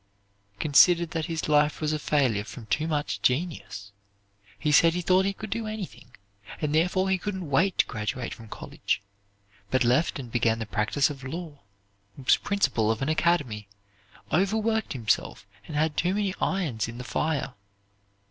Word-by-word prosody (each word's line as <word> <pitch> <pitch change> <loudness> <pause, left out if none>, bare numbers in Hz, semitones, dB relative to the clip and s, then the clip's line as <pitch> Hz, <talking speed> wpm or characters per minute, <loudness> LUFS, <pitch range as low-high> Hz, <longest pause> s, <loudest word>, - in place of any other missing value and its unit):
considered 170 - +5
that 160 -1 -2
his 165 -2 -3
life 150 0 +3
was 155 -1 0
a 155 - -1
failure 130 -9 +1
from 115 +1 -10
too 155 +8 0
much 150 -2 -2
genius. 125 - -1 0.7
He 150 - 0
said 165 +3 +5
he 180 - -1
thought 185 +2 +4
he 200 - +1
could 215 +2 -8
do 230 -1 -2
anything, 210 - -7 0.4
and 150 -1 -1
therefore 180 +4 +2
he 190 -1 +1
couldn't 190 -6 -4
wait 180 +8 +2
to - - +4
graduate 115 +2 -4
from 115 - -12
college, 100 - -3 0.7
but 130 +4 +2
left 125 +7 +2
and 125 -4 -8
began 115 -1 +2
the 115 - -4
practise 110 +8 +1
of 135 -2 -9
law, 155 +1 -6 0.6
was 135 -2 +4
principal 135 - +1
of 110 +3 0
an 140 - -1
academy, 145 -11 +1 0.6
overworked 220 +5 +1
himself, 110 -5 -1 0.2
and 155 - -6
had 155 0 +1
too 180 +3 +1
many 205 -2 0
irons 155 - 0
in 115 +1 -8
the 125 - -6
fire. 140 +1 -1
150 Hz, 165 wpm, -27 LUFS, 125-180 Hz, 0.7 s, considered